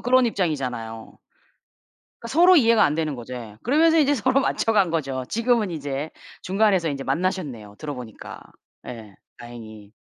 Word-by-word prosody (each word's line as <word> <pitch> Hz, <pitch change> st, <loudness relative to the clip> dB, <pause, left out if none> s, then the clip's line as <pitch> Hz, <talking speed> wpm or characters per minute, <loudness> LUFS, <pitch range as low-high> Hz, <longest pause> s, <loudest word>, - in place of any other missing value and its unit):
그런 255 Hz, +1 st, +3 dB
입장이잖아요. 130 Hz, -, -3 dB, 1.1 s
서로 350 Hz, +8 st, +5 dB
이해가 230 Hz, -7 st, +5 dB
안되는거죠. 145 Hz, -5 st, -3 dB
예. 115 Hz, -4 st, -8 dB
그러면서 320 Hz, +6 st, +4 dB
이제 290 Hz, -1 st, +3 dB
서로 260 Hz, +2 st, +2 dB
맞춰간거죠. 165 Hz, -, 0 dB
지금은 230 Hz, -4 st, +1 dB
이제 145 Hz, -1 st, -4 dB, 0.3 s
중간에서 190 Hz, -3 st, +2 dB
이제 135 Hz, -2 st, -4 dB
만나셨네요. 135 Hz, -, -3 dB
들어보니까. 125 Hz, -7 st, -8 dB, 0.5 s
예. 110 Hz, -5 st, -9 dB, 0.2 s
다행히. 110 Hz, -3 st, -11 dB
155 Hz, 340 characters per minute, -23 LUFS, -, 1.1 s, 서로